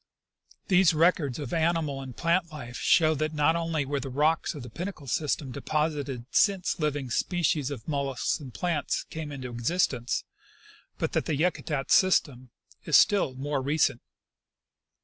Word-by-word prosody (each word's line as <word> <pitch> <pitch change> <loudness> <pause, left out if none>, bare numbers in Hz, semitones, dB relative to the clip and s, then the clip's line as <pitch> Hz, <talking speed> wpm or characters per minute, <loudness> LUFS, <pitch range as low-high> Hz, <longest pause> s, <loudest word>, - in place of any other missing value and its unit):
These 180 -4 +4
records 155 -5 +2
of 140 -5 -5
animal 160 -4 0
and 130 -3 -9
plant 170 0 +1
life 120 -6 -8
show 160 -2 +4
that 155 +1 -2
not 150 +2 +3
only 165 -3 -1
were 140 +1 -2
the 135 - -5
rocks 150 +6 +1
of 145 - -7
the 125 - -8
Pinnacle 175 - -6
sys 145 +3 0
tem 135 -4 -8
deposited 145 -3 -2
since 195 -4 +2
living 145 -4 -2
species 155 -3 0
of 135 -6 -7
moUusks 140 -1 -1
and 135 -4 -9
plants 170 +1 -1
came 155 -2 -5
into 130 -3 -6
existence, 120 0 0 0.7
but - - -2
that - - 0
the 155 - -1
Yakutat 150 -3 -1
system 140 -9 +3 0.3
is - - +5
still 195 -11 +3
more 140 +1 -2
recent. 140 -3 +1
150 Hz, 155 wpm, -27 LUFS, 135-165 Hz, 0.7 s, is